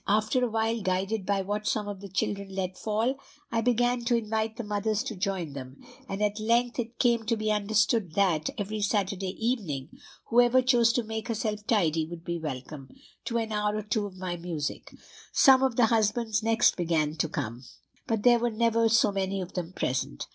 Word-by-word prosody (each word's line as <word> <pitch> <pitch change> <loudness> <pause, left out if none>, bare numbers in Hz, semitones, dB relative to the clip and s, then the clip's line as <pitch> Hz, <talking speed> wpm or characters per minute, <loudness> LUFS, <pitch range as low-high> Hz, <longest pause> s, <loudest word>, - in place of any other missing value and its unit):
After 215 +5 +2
a 245 - +1
while, 225 +1 0
guided 190 +2 -1
by 200 -1 +1
what 205 +2 -3
some 210 -2 0
of 200 -2 -6
the 200 - -8
children 195 +1 -2
let 185 -1 -2
fall; 225 +7 -1 0.3
I 230 -1 +1
began 245 +1 +1
to 240 0 +3
invite 220 0 -2
the 235 - -4
mothers 210 0 -1
to 220 - -5
join 185 -5 -2
them; 130 -1 -9 0.3
and 195 +1 -2
at 210 +1 0
length 235 +3 +1
it 235 0 -4
came 235 -2 +2
to 230 0 +1
be 215 0 0
understood 210 -3 +1
that, 185 - +2
every 210 0 -3
Saturday 195 -2 -1
evening, 195 - -2 0.4
whoever 245 +2 +5
chose 240 -3 +4
to 245 - +1
make 220 +1 -5
herself 215 -2 -3
tidy 165 -8 +2
would 170 0 -9
be 170 0 -2
welcome, 135 -2 -6 0.4
to 235 - -1
an 225 -1 -2
hour 210 0 0
or 215 - -3
two 210 0 -1
of 185 -2 -13
my 185 -1 -3
music. 165 -4 -4 0.4
Some 265 -1 +6
of 265 -3 +1
the 245 - +5
husbands 220 0 +1
next 225 +2 +3
began 160 -3 0
to 160 0 0
come, 125 -5 -4 0.4
but 225 -2 -1
there 240 -1 +6
were 240 +1 +1
never 230 0 +2
so 220 -2 +4
many 195 0 -1
of 185 -1 -6
them 175 -2 -4
present. 130 - -2
210 Hz, 200 wpm, -28 LUFS, 185-230 Hz, 0.4 s, Some